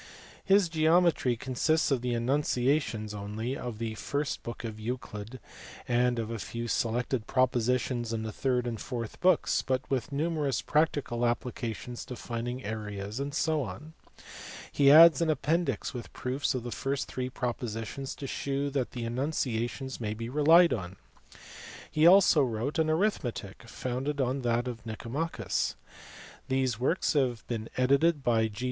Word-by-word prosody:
His 195 -1 +4
Geometry 160 -5 +3
consists 145 +7 +1
of 130 -3 +2
the 125 -1 -1
enunciations 125 -3 0
(only) 105 +5 -4
of 120 -5 -5
the 115 0 -3
first 140 +6 -3
book 120 - -7
of 110 -2 -6
Euclid, 115 0 -5 0.5
and 120 0 +2
of 115 -1 -3
a 115 - -4
few 115 +3 -5
selected 120 +1 -1
propositions 125 -1 +1
in 110 -1 -2
the 110 - -4
third 125 +2 0
and 115 -3 -4
fourth 120 -3 -5
books, 185 +1 +3
but 130 -1 -1
with 135 +3 -1
numerous 145 -3 0
practical 145 -6 +1
applications 120 0 -3
to 125 - -7
finding 120 +2 -4
areas, 105 0 -5
<fec. 140 - -1 0.9
He 140 -1 +4
adds 165 +3 +9
an 165 - +2
appendix 160 +3 0
with 120 -2 -7
proofs 130 +2 -1
of 125 - -3
the 120 - -5
first 135 +2 -2
three 130 0 -3
propositions 120 +1 -4
to 140 - -7
shew 140 +1 -2
that 135 -3 -2
the 120 -2 -4
enunciations 125 0 -2
may 105 -1 -2
be 115 +1 -5
relied 160 +5 +6
on. 95 -4 -5 1.0
He 155 +2 +5
also 180 -4 +7
wrote 125 +4 -1
an 160 -1 +2
Arithmetic, 155 - -1
founded 130 +5 -3
on 130 +1 0
that 120 0 0
of 115 -2 -6
Mcomachus. 120 +8 -2 0.7
These 130 -4 0
works 150 +10 +1
have 130 -6 0
been 115 -2 -4
edited 140 +4 +3
by 115 -3 +3
G. 105 0 -10
125 Hz, 150 wpm, -29 LUFS, 115-145 Hz, 1.0 s, adds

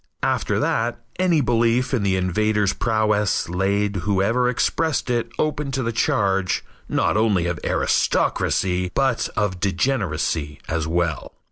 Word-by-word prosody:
After - - 0
that, 120 +1 0 0.2
any 175 -4 +3
belief 120 +1 +1
in 125 - +1
the 95 -1 +1
invader's 105 +2 +1
prowess 110 -3 +1
laid 100 +3 0
whoever 100 +7 +1
expressed 150 +2 0
it 120 -1 -1
open 150 -2 -1
to 130 0 -1
the 115 - -1
charge, 95 -4 0 0.2
not - - +1
only 105 -6 +2
of 85 0 -2
aristocracy, 90 -1 +1
but 135 -4 +1
of 105 -3 -1
degeneracy 90 - -1
as 80 -1 -2
well. 85 -3 -1
105 Hz, 130 wpm, -22 LUFS, 90-120 Hz, 0.2 s, any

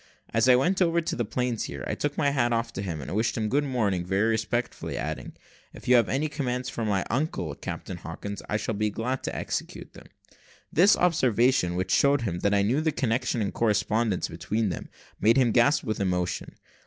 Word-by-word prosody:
As 115 +3 +3
I 125 - +8
went 180 +10 +2
over 170 -1 +3
the 160 -7 -2
planeshear, 115 - -3
I - - -1
took 145 0 -2
my 145 -3 +2
hat 120 -4 +1
off 115 0 -1
to 95 - -4
him, 85 -6 -4
and 70 - -6
wished 110 +3 0
him 110 -1 -1
good 145 +5 +2
morning 110 -10 0
very 95 +5 +1
respectfully, 115 +2 -2
adding, - - -4 0.4
"If - - -12
you 125 - +6
have 120 - +4
any 140 +4 0
commands 125 -4 -3
for 115 - -4
my 100 -3 0
uncle, 120 - -1
Captain 90 +4 -6
Hawkins, 100 +5 -7
I 105 - +1
shall 110 +1 -3
be 105 +1 0
glad 125 +5 -3
to - - -3
execute - - -4
them." - - -14 0.7
This 190 +7 +6
observation, 125 - +2
which 95 +1 -2
showed 140 -2 +3
him 90 -6 -2
that 100 - +1
I 100 - +3
knew 125 +9 +1
the 160 0 +1
connection 120 -3 0
and 100 - -3
correspondence 110 -2 +1
between 100 +7 -2
them, - - -5 0.3
made 115 +5 +4
him 125 -3 +4
gasp 130 +6 +3
with 110 -3 -3
emotion. 90 -2 -2
115 Hz, 205 wpm, -27 LUFS, 100-130 Hz, 0.7 s, I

